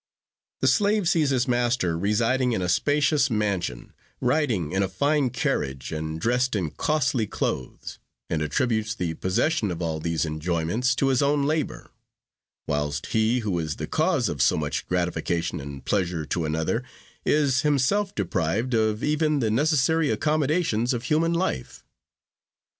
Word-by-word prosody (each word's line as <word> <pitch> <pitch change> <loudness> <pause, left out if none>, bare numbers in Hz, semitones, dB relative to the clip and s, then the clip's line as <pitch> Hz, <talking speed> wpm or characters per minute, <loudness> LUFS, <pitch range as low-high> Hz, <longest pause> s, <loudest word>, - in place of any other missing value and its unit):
The - - +3
slave 205 -2 +3
sees 160 -5 +3
his 130 -1 +1
master 120 -8 +1
residing 115 +7 +1
in 95 - -1
a 90 - -1
spacious 145 - +2
mansion, 100 - -2 0.3
riding 125 - 0
in 95 - +1
a 95 - 0
fine 140 +7 +1
carriage, 65 - -2
and 80 0 -4
dressed 125 +4 +1
in 85 -7 -1
costly 130 -7 0
clothes, 65 - -4 0.3
and 80 - -1
attributes 110 - 0
the 90 -5 -2
possession 105 - 0
of 85 -2 -4
all 80 -2 -2
these 85 +1 -1
enjoyments 85 - -1
to 135 - +1
his 130 -2 +2
own 140 0 +2
labor; 155 +1 -2 0.7
whilst 75 0 -2
he 110 +3 +2
who 100 -6 -1
is 80 -2 -3
the - - -4
cause - - +1
of - - -3
so - - +4
much 75 -1 -3
gratification 85 -1 -1
and 70 -1 -8
pleasure 90 -5 -1
to 85 +2 -2
another, 80 +10 -1 0.4
is 140 -3 +2
himself 150 +8 +1
deprived 100 +5 -1
of 110 -1 +1
even 150 0 +1
the 115 -6 0
necessary 150 +4 +2
accommodations 150 -5 +1
of 120 - -4
human 165 +4 +1
life. 170 - -2
115 Hz, 150 wpm, -25 LUFS, 85-145 Hz, 0.7 s, so